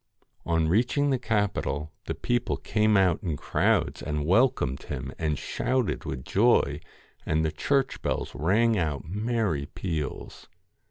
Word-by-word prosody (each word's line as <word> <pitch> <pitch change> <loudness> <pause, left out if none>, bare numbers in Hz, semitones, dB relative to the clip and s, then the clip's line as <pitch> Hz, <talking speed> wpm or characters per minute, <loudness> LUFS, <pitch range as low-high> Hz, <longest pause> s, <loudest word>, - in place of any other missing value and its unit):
On 80 -1 +2
reaching 125 - +2
the 130 - +1
capital, 100 - -1
the - - -3
people 120 0 -1
came 105 -1 +2
out 95 -4 +3
in 80 -5 -2
crowds - - +1
and 75 -1 -2
welcomed 90 - +2
him, 65 +2 -5
and 75 -3 0
shouted 130 - -1
with 65 -1 -5
joy, 100 - +3 0.4
and 80 +1 +1
the 80 - 0
church 135 - 0
bells - - -2
rang 105 +8 +2
out 80 -2 -2
merry 105 -6 -1
peals. 80 -5 -5
95 Hz, 140 wpm, -27 LUFS, 75-115 Hz, 0.4 s, out